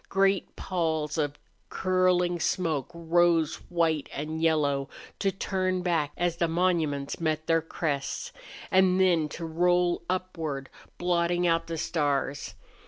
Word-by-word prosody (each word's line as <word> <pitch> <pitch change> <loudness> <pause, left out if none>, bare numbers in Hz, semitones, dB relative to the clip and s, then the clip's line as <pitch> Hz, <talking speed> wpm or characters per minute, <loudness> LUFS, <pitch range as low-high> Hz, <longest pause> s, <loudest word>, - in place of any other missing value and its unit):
Great 195 0 +1
palls 160 -4 -1
of 145 -1 -1 0.3
curling 180 -1 +2
smoke 160 -6 0
rose 170 -1 +2
white 165 -4 +1
and 155 +2 -4
yellow, 145 -4 +1 0.3
to 195 - +1
turn 185 -1 -1
back 165 -5 +1
as 175 -1 0
the 170 - +2
monuments 160 -5 0
met 155 -1 -1
their 165 0 +3
crests, 150 -3 -3 0.4
and 185 0 +4
then 170 -5 +3
to 165 +3 -6
roll 175 +2 +2
upward, 165 -7 -3 0.3
blotting 175 0 +1
out 165 -1 +2
the 165 0 -4
stars. 145 -3 -1
170 Hz, 125 wpm, -28 LUFS, 155-180 Hz, 0.4 s, and